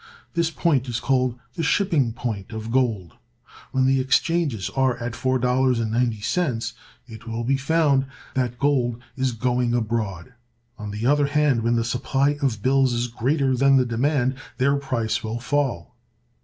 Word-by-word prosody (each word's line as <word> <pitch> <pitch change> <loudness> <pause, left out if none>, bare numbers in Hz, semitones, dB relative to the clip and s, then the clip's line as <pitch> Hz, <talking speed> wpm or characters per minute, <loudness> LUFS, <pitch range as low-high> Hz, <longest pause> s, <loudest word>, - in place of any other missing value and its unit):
This 170 -2 +1
point 145 -6 0
is 120 0 -2
called 130 -2 +1 0.2
the - - -4
"shipping 160 - +2
point" 110 -5 -5
of 110 +1 -5
gold. 115 -9 0 0.6
When 130 0 +2
the 135 0 +3
exchanges 135 - +1
are 130 -2 +1
at 120 0 -4
$4.90, 125 0 0 0.3
it 115 -1 -12
will 115 +1 -3
be 135 +4 +2
found 140 -1 +2 0.3
that 125 -2 -1
gold 125 -4 +1 0.2
is 130 -1 0
going 125 0 0
abroad. 110 -4 -2 0.5
On 105 0 -6
the 105 +3 -4
other 145 +2 +3
hand, 145 -4 +2
when 115 +1 +1
the 115 - +1
supply 135 +4 0
of 115 -7 -1
bills 135 -1 +3
is 120 0 0
greater 130 +3 +1
than 135 +2 +4
the 130 -1 +4
demand, 130 +2 +1 0.2
their 140 +2 +3
price 130 -6 -2
will 110 +1 -3
fall. 135 -1 -2
125 Hz, 155 wpm, -23 LUFS, 115-135 Hz, 0.6 s, than